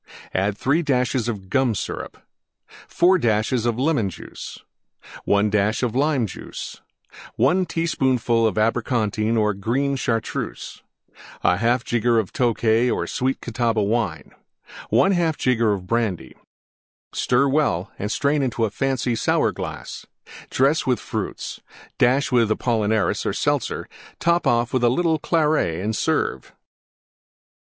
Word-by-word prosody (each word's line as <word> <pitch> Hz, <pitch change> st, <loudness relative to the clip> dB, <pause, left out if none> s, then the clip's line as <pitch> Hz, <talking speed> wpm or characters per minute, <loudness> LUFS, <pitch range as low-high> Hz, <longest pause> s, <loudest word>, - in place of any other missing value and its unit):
3 140 Hz, +10 st, +1 dB
dashes 125 Hz, -5 st, 0 dB
Gum 115 Hz, +3 st, 0 dB
Syrup -, -, -5 dB, 0.7 s
4 180 Hz, +2 st, +3 dB
dashes 115 Hz, 0 st, +1 dB
Lemon 120 Hz, -2 st, +1 dB
Juice. -, -, -9 dB, 0.7 s
1 100 Hz, +1 st, +2 dB
dash 105 Hz, +3 st, +1 dB
Lime 130 Hz, +2 st, +1 dB
Juice. 100 Hz, -, -8 dB, 0.5 s
1 180 Hz, +10 st, +2 dB
teaspoonful 125 Hz, -9 st, +1 dB
Abricontine 110 Hz, 0 st, 0 dB
or 105 Hz, -1 st, +2 dB
green 125 Hz, +8 st, -1 dB
Chartreuse. 115 Hz, -3 st, -3 dB, 0.6 s
1/2 115 Hz, +7 st, +2 dB
jigger 120 Hz, -1 st, +2 dB
Tokay 115 Hz, +2 st, +1 dB
or -, -, -1 dB
Sweet 130 Hz, +1 st, -2 dB
Catawba 115 Hz, -2 st, 0 dB
Wine. 110 Hz, -2 st, -1 dB, 0.6 s
1/2 175 Hz, -5 st, +3 dB
jigger 115 Hz, -5 st, +2 dB
Brandy. 95 Hz, -, -2 dB, 0.8 s
Stir 130 Hz, +3 st, +2 dB
well 135 Hz, -, 0 dB
and 105 Hz, +2 st, -3 dB
strain 145 Hz, +4 st, +1 dB
into 120 Hz, -3 st, 0 dB
a 105 Hz, -, -3 dB
fancy 130 Hz, 0 st, -1 dB
Sour 115 Hz, -, +1 dB
glass; -, -, -7 dB, 0.4 s
dress 135 Hz, +2 st, +2 dB
with 125 Hz, -2 st, +2 dB
Fruits; -, -, -5 dB, 0.4 s
dash 135 Hz, +4 st, +3 dB
with 120 Hz, -3 st, +3 dB
Apollinaris 110 Hz, -2 st, 0 dB
or -, -, -1 dB
Seltzer; -, -, -1 dB, 0.3 s
top 170 Hz, +1 st, +1 dB
off 120 Hz, 0 st, +1 dB
with 130 Hz, -2 st, +1 dB
a 120 Hz, -, +5 dB
little 160 Hz, +4 st, +1 dB
Claret 150 Hz, -, +1 dB
and 105 Hz, +4 st, -2 dB
serve. -, -, -1 dB
120 Hz, 115 wpm, -22 LUFS, 110-135 Hz, 0.8 s, a